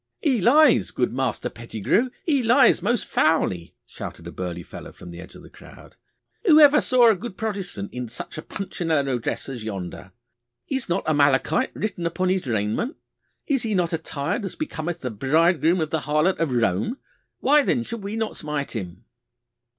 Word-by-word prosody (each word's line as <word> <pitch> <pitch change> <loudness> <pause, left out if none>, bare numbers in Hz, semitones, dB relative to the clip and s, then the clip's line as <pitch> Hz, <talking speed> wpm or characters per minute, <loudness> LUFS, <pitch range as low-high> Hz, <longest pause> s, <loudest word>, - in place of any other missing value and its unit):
'He 265 - +1
lies, 280 - +5
good 125 - -1
Master 130 -3 -1
Pettigrue, 115 - -1 0.2
he 285 -5 +2
lies 245 +2 +5
most 240 -3 0
foully,' 95 - +1
shouted 85 - -9
a 85 - -7
burly 90 -1 -5
fellow - - -10
from 90 - -12
the 85 - -10
edge 90 - -11
of - - -13
the - - -14
crowd. - - -15 0.5
'Who 310 -3 +8
ever 295 0 +7
saw 245 -3 +5
a - - +1
good 205 +1 -8
Protestant 195 - -4
in 125 -2 -5
such - - -8
a 155 - -5
Punchinello 155 -9 -2
dress 115 - -3
as 125 -5 -6
yonder? 95 -3 -6 0.6
Is 265 -6 -2
not 175 0 -1
Amalekite 145 - +2
written 180 -5 -2
upon 185 +2 -1
his 185 -6 0
raiment? 110 - -1 0.5
Is 275 -4 +1
he 220 -3 -1
not 175 -2 0
attired 160 +5 -3
as 195 - -5
becometh 175 - -4
the 125 - -3
bridegroom 160 - +2
of 155 -2 -2
the 160 - +1
harlot 155 +5 +1
of 165 -5 0
Rome? 115 - 0 0.4
Why 295 +2 +4
then 245 -3 0
should 230 -1 -6
we 200 +2 -4
not 220 -1 -2
smite 150 -2 -4
him? 95 -1 -7
165 Hz, 180 wpm, -23 LUFS, -, 0.6 s, Who